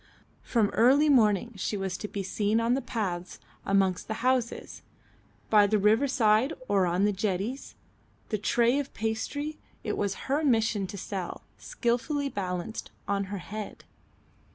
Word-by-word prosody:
From 220 -4 +1
early 275 +6 +4
morning 235 -3 +3
she 205 +2 -2
was 190 -2 -2
to 210 - -5
be 200 -1 -4
seen 210 +3 0
on 230 +1 +2
the 270 - +1
paths 180 -8 -3 0.3
amongst 195 -2 +2
the 220 +1 -4
houses 255 -2 0 0.7
by 210 -2 +6
the 215 +1 +2
riverside 225 +3 +3
or 195 -3 +3
on 180 +3 +2
the 210 - +3
jetties, 200 +6 -3 0.5
the 215 - -1
tray 240 +5 +2
of 280 -1 -5
pastry, 285 +8 -3 0.2
it - - -2
was 200 -1 -2
her 285 +4 +1
mission 225 -7 +2
to 200 - -7
sell, 185 -2 -5 0.2
skilfully 275 +4 -1
balanced 185 0 -4 0.2
on 200 0 0
her 200 +1 -5
head. 210 +4 -7
215 Hz, 150 wpm, -28 LUFS, 195-245 Hz, 0.7 s, by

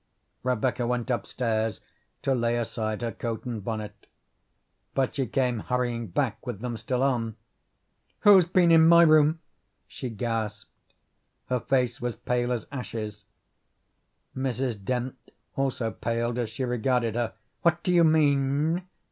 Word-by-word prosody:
Rebecca 125 -1 0
went 125 0 -1
upstairs 115 -1 -1 0.4
to 135 - +2
lay 120 -1 +1
aside 110 -1 -3
her 115 - -1
coat 115 0 -4
and 115 -5 -4
bonnet. 110 -1 -5 0.9
But 135 -2 +1
she 135 -4 -1
came 125 0 0
hurrying 120 0 -1
back 110 +5 -1
with 120 -6 -4
them 120 0 -4
still 125 +4 -1
on. 115 -5 0 0.9
"Who's 195 -4 +7
been 175 -1 +4
in 160 0 +7
my 170 0 +8
room?" 155 0 +5 0.5
she 130 - -6
gasped. 110 -2 -5 0.5
Her 125 0 +1
face 125 0 0
was 120 -1 -2
pale 125 0 -1
as 120 -2 -2
ashes. 110 -6 -6 1.1
Mrs. 130 -5 -2
Dent 125 +4 -2 0.4
also 130 -4 -1
paled 115 +4 -2
as 120 -3 -1
she 115 +4 -4
regarded 125 -1 0
her. 120 -1 -2 0.3
"What 170 0 +2
do 180 - +1
you 170 -1 +6
mean?" 155 +2 +2
125 Hz, 140 wpm, -27 LUFS, 115-135 Hz, 1.1 s, my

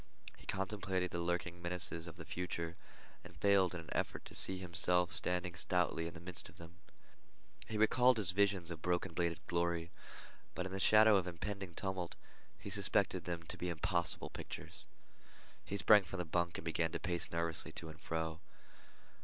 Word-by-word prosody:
He - - -17
contemplated 95 -2 -1
the 85 - -2
lurking 85 0 -2
menaces 85 -1 -2
of 85 - -8
the 85 -2 -9
future, 85 -2 -3 0.5
and 85 0 -13
failed 95 -2 +4
in 85 - -4
an 80 - -14
effort - - -2
to - - -10
see 95 - +1
himself 90 0 +1
standing 90 0 0
stoutly 85 -3 +1
in 85 - -8
the - - -7
midst 85 +1 -7
of - - -17
them. 85 +1 -12 0.9
He 110 - -3
recalled 125 +3 +5
his 100 -5 +4
visions 95 -3 +2
of 80 -2 -6
broken 90 -1 0
bladed 85 0 -1
glory, 85 -1 0 0.6
but 90 - -2
in 95 - -5
the 95 - -3
shadow 110 +1 +7
of 95 - +1
the - - -2
impending 95 +1 -5
tumult 95 -3 -2 0.4
he 100 - -7
suspected 100 -2 +2
them 85 -2 -3
to - - -5
be 90 - -1
impossible 85 +1 0
pictures. - - -4 0.8
He 100 - -3
sprang 105 +2 +7
from 95 +2 -6
the 90 - -2
bunk 85 +1 0
and - - -8
began 80 0 0
to - - -1
pace 85 -1 -1
nervously 85 -1 -1
to 80 - -6
and 80 - -11
fro. 80 -1 -2
90 Hz, 185 wpm, -37 LUFS, 85-95 Hz, 0.9 s, shadow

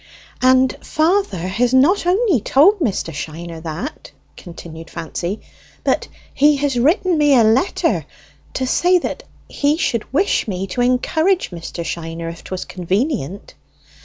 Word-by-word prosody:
"And 255 0 +4
father 325 - +1
has 240 +7 +1
not 340 +8 +4
only 375 - +3
told 360 - +4
Mr. 205 - -1
Shiner 165 +2 -7
that," 165 - -6 0.2
continued 165 -2 -10
Fancy, 170 +4 -5 0.4
"but - - 0 0.3
he 295 +2 +4
has 275 -3 0
written 330 - +2
me 290 -2 +5
a 235 - +6
letter, 225 - +1 0.5
to 260 - -1
say 355 +7 +3 0.5
he 290 +2 0
should 235 -9 -2
wish 340 +2 +1
me 190 -2 -3
to 195 +6 -3
encourage 315 - +1
Mr. 170 0 -6
Shiner, 165 0 -5
if 165 0 -10
'twas 185 -1 -5
convenient!" 195 - -2
245 Hz, 130 wpm, -19 LUFS, -, 0.5 s, a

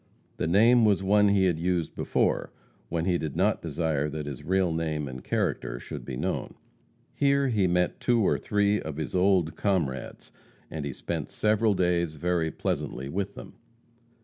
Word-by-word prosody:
The - - -1
name 115 +7 +5
was 100 -3 +3
one 105 +2 +4
he 100 -1 +3
had 85 -3 +1
used 85 -1 -1
before - - 0 0.4
when 85 0 -1
he 90 -2 +1
did 75 -3 -4
not - - +1
desire 75 -3 -1
that 75 0 -5
his 70 -4 -6
real 95 -1 +1
name 80 -3 -2
and 65 -1 -8
character - - -2
should - - -8
be 65 -2 -5
known. - - -3 0.6
Here 140 -1 +2
he 105 -6 +2
met 90 0 +1
two 120 -1 +2
or - - +2
three 105 0 +1
of 75 -2 -6
his 80 - -4
old 90 -4 +2
comrades, 80 -12 -2 0.4
and 75 -2 -4
he 70 - -3
spent - - -4
several 105 0 +2
days 85 -3 +1
very 85 +1 0
pleasantly 65 -3 -3
with 95 +5 -3
them. - - -10
90 Hz, 175 wpm, -27 LUFS, 80-100 Hz, 0.6 s, name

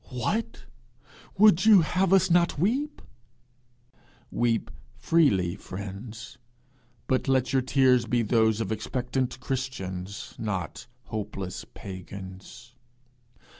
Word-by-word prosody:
'What, 210 - -3 0.7
would 200 -4 +6
you 210 -5 +8
have 180 +3 +1
us 190 -2 +4
not 170 -1 +3
weep?' 255 - -1 1.3
Weep 115 -9 0 0.2
freely, 100 - +2
friends; 105 +6 -8 0.7
but 130 +2 0
let 130 0 +1
your 135 - +4
tears 130 -2 +3
be 120 0 +1
those 110 -1 +2
of 110 - -3
expectant 125 +4 -2
Christians, 100 -8 -5
not 95 -5 -4 0.2
hopeless 100 -3 -5
pagans. 95 +5 -10
120 Hz, 95 wpm, -27 LUFS, 100-145 Hz, 1.3 s, you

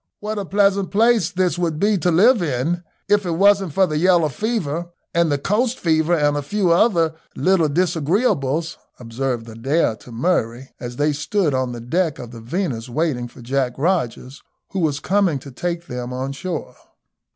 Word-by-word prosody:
"What 210 0 -3
a 200 - -4
pleasant 200 0 +2
place 220 -3 +3
this 180 -1 0
would 165 -3 -1
be 210 +3 +3
to 175 - +1
live 210 +7 +5
in 165 +4 -1 0.2
if 205 0 +3
it 175 -3 -2
wasn't 195 0 +3
for 190 +6 +3
the 155 -3 -2
yellow 175 -3 +4
fever, 175 - -2 0.2
and 170 -2 +2
the 145 - +2
coast 230 - 0
fever, 160 0 +2
and 145 -2 +2
a 145 - -1
few 185 +4 0
other 170 -4 +3 0.2
little 180 -4 +2
disagreeables," 165 - 0 0.2
observed 120 0 -3
Adair 115 +3 0
to 125 - -14
Murray, 120 -2 -1
as 120 -1 -6
they 145 +3 +1
stood 160 +2 0
on 130 -1 0
the 120 -1 -7
deck 160 +5 0
of 120 -2 -9
the 115 -2 -10
Venus 125 - -3
waiting 130 -3 -1
for 120 0 -14
Jack 130 0 0
Rogers, 135 -5 -1 0.3
who 195 - -2
was 150 -4 0
coming 190 -5 +1
to 135 +1 -10
take 170 +5 -3
them 125 -2 -5
on 130 +2 -3
shore. 160 +4 -5
165 Hz, 180 wpm, -21 LUFS, 135-185 Hz, 0.3 s, live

